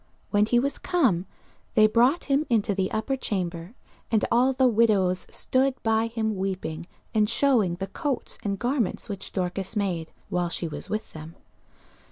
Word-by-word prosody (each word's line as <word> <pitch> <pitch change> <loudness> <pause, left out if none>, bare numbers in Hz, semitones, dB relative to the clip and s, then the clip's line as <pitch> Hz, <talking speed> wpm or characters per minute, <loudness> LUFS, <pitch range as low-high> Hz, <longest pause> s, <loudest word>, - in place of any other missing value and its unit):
When 210 0 +3
he 240 - +3
was 275 +3 +1
come, 240 - +1 0.5
they 215 -2 +7
brought 240 +9 +3
him 280 +1 +2
into 220 -3 +2
the 190 -1 0
upper 225 +5 -1
chamber: 180 -4 -3 0.3
and 220 -2 +2
all 250 +3 +4
the 260 0 +3
widows 205 -6 +2
stood 260 0 +1
by 225 0 +2
him 220 -2 -2
weeping, 185 -4 -3 0.3
and 210 -1 +3
shewing 230 -10 +2
the 190 +2 -4
coats 270 - -3
and 200 -1 -2
garments 245 -3 -1
which 200 -2 -6
Dorcas 185 +2 -3
made, 180 -6 -1 0.2
while 175 -1 0
she 170 - -3
was 155 - -7
with 215 +1 -4
them. 160 +1 -9
215 Hz, 165 wpm, -26 LUFS, 185-245 Hz, 0.5 s, they